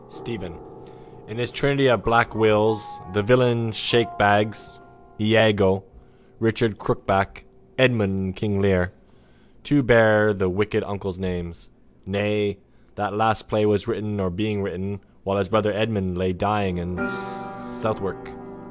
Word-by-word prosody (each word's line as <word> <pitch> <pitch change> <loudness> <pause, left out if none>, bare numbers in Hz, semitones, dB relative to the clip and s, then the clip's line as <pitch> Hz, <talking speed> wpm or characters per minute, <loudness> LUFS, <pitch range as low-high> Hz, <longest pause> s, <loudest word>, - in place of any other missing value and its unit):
STEPHEN: - - -9 0.7
In 105 - -10
his 120 -1 -3
trinity 140 -1 +1
of 120 -3 +4
black 115 0 +3
Wills, 110 +4 +2
the 105 - +1
villain 120 0 +3
shakebags, 105 -1 +1 0.4
Iago, 105 -3 +4 0.6
Richard 115 -1 0
Crookback, 95 0 -1 0.3
Edmund 110 -7 +3
in - - -6
King 100 0 -2
Lear, 95 -2 +2 0.7
two 145 -1 +2
bear 110 -3 +5
the 95 -2 -1
wicked 105 +3 -1
uncles' 100 -2 -6
names. 90 -2 -6 0.3
Nay, 105 +1 -1 0.4
that 105 0 -3
last 110 0 +1
play 110 -1 0
was 105 -3 +1
written 105 0 -4
or 95 -1 -1
being 105 +2 -2
written 100 +1 -6 0.2
while 100 +1 -1
his 100 -2 -1
brother 105 0 +2
Edmund 100 -4 -2
lay 95 0 -1
dying 100 -1 -1
in 90 +1 -4
Southwark. 130 - -6
105 Hz, 130 wpm, -23 LUFS, 100-115 Hz, 0.7 s, bear